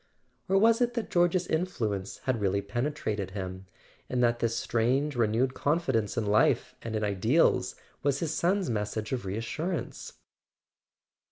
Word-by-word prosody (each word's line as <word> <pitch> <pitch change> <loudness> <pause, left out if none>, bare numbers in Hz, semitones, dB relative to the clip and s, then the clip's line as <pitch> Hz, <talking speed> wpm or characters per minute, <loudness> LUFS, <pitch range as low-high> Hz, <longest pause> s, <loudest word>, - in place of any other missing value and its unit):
Or 195 - +4
was 225 +4 +4
it 240 0 +1
that 235 - -3
George's 175 +1 +3
influence 110 - -2
had 130 -4 0
really 100 0 +1
penetrated 110 -3 -2
him, 95 0 -6 0.4
and 125 -1 +1
that 120 0 +2
this 115 0 0
strange 130 +6 +1
re¬ 115 -4 +2
newed 125 +4 +1
confidence 130 -9 0
in 115 - +1
life 105 +1 +3
and 115 -1 -4
in 110 - -1
ideals 105 - +2 0.3
was 140 -1 +1
his 160 0 -2
son's 185 +3 +1
message 105 -1 -2
of 125 -6 -2
reassurance 120 - -4
120 Hz, 150 wpm, -29 LUFS, 105-160 Hz, 0.4 s, Or